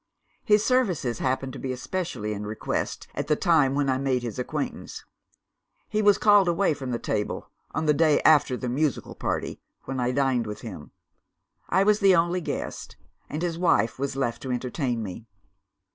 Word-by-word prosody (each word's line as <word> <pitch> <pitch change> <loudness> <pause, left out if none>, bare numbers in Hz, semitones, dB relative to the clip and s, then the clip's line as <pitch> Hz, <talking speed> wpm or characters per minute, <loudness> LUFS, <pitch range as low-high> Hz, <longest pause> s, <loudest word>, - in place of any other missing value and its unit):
His 210 0 +3
services 185 - +1
happened 130 0 -1
to 140 - -7
be 130 -1 -3
specially 125 - -3
in 105 0 -5
request, 105 +1 -3
at - - -3
the 150 - +3
time 150 -6 +3
when 145 -1 +1
I 130 -1 +1
made 130 -2 0
his 120 +1 -5
acquaintance. 125 - -4 0.8
He 215 0 0
was 205 -2 +5
called 205 -3 +5
away 175 0 +2
from 135 -3 -5
his 120 - -2
table, 105 - -3 0.2
on 155 - 0
the 150 - +4
day 155 0 +4
after 145 -4 +4
the 125 - -4
musical 140 +3 -1
party, - - -3 0.2
when 135 -1 -4
I 125 0 +1
dined 130 -3 +1
with 105 - -6
him. 95 -10 -8 0.8
I 190 +2 +3
was 210 +1 +3
the 195 -2 +5
only 175 +2 +1
guest - - -5 0.3
and 155 +4 -3
his 170 -1 -2
wife 165 -10 +2
was 140 0 -2
left 120 -4 -2
to 130 - -4
entertain 125 -1 -2
me. 105 +3 -8
135 Hz, 180 wpm, -26 LUFS, 125-170 Hz, 0.8 s, was